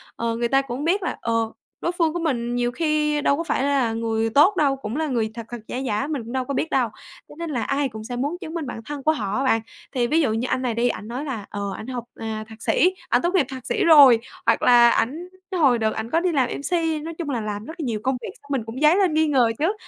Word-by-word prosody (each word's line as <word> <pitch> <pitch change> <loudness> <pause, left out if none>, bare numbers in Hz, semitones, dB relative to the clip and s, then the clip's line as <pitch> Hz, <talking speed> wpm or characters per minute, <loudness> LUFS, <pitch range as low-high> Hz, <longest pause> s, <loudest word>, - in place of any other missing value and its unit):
ờ, 230 0 -2
người 235 +1 0
ta 270 +3 +3
cũng 270 +1 -5
biết 370 +5 +1
là, - - -2
ờ, 230 -1 0 0.3
đối 345 - +1
phương 335 -3 0
của 345 - -2
mình 245 -7 -1
nhiều 245 0 0
khi 300 0 0
đâu 280 -1 +2
có 335 - -2
phải 280 -4 -1
là 275 -5 +1
người 225 0 -1
tốt 295 - +5
đâu, 280 -3 +3
cũng 230 -4 -6
là 315 0 0
người 230 -5 -1
thật 230 0 -7
thật, 240 - -5
giả - - -4
giả 260 0 -1
mình 295 -6 -3
cũng 230 - -9
đâu 260 -1 -1
có 280 - -3
biết 320 - -1
đâu, 250 -4 +1 0.4
cho - - -12
nên 335 -1 -4
là 250 -6 -1
ai 275 0 0
cũng 220 -2 -8
sẽ 245 +2 -5
muốn 285 +8 -2
chứng 315 - -7
minh 330 -5 -3
bản 240 - -6
thân 290 -2 -6
của 310 - +4
họ 210 -8 -2
á, 265 - 0
bạn. 225 -4 +2 0.3
Thì 245 -3 0
ví 315 +6 +3
dụ 260 -8 +1
như 230 +3 -1
anh 255 - 0
này 250 -2 -1
đi, 235 +2 +1
ảnh 210 - -5
nói 250 +6 -4
là, 235 -8 -4
ờ, 200 -1 -4
ảnh 220 - -8
học, 250 -2 -4 0.2
à, 220 -1 -4
thạc 220 0 -13
sĩ, 365 +9 +3 0.2
ảnh - - +3
tốt 345 +2 0
nghiệp 335 -7 +4
thạc 260 -2 -8
sĩ - - 0
rồi 285 -8 +8 0.3
hoặc - - +3
là 240 -1 +7
ảnh 310 +12 -1 0.3
hồi 275 -7 +4
đợt 220 -1 0
ảnh 220 +1 -4
có 325 - +2
đi 360 +1 0
làm 265 -6 +1
MC, 320 +1 -1
nói 330 +1 -5
chung 330 -4 -4
là 245 -5 -1
làm 210 0 -4
rất 320 - -7
là - - -3
nhiều 225 -4 -2
công 265 0 +1
việc - - -6
xong - - -20
mình 265 -5 0
cũng 230 +5 -7
dấy 305 +3 +6
lên 380 -5 +3
nghi 315 0 +3
ngờ 255 -6 +3
chứ. 330 +7 +2
265 Hz, 295 wpm, -23 LUFS, 230-310 Hz, 0.4 s, rồi